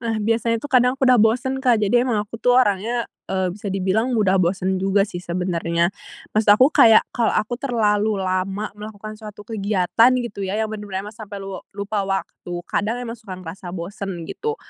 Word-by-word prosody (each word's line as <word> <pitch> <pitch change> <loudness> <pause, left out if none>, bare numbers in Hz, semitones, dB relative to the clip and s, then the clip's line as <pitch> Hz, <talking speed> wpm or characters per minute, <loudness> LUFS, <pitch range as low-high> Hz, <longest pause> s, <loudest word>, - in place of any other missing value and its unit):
Nah, 230 -2 -2
biasanya 230 +2 +1
tuh, 285 +6 -7
kadang 250 0 +4
aku 270 - +1
udah 250 -3 +5
bosen, 250 +4 +1
Kak. 250 -3 +4
Jadi 210 +4 +3
emang 245 -4 0
aku 225 +2 -10
tuh, 245 0 +4
orangnya, 230 +1 +2 0.2
eee, 190 -2 -1
bisa 200 +1 -6
dibilang 195 +6 0
mudah 195 -3 +3
bosen 185 +1 0
juga 195 +1 +2
sih, 190 -4 -7
sebenernya. 170 -1 -1 0.4
Maksud 215 0 +3
aku, 260 +5 +5
kayak, 225 -5 +7
kalau 235 -2 +1
aku 215 +3 0
terlalu 215 -5 +1
lama 190 +2 -2
melakukan 210 0 -9
suatu 210 -1 -10
kegiatan, 210 +1 +2
gitu 205 -3 -7
ya, 200 - -2
yang 220 0 -1
bener-bener 205 -2 -5
emang 210 - -8
sampai 210 -3 -8
lua 195 -1 -6 0.2
lupa 200 +1 -2
waktu, 190 -2 -4
kadang 210 +5 -1
emang 230 - -5
suka 205 -5 -9
ngerasa 180 +1 -9
bosen, 180 0 -5
gitu. 445 - -4
210 Hz, 190 wpm, -22 LUFS, 190-230 Hz, 0.4 s, kayak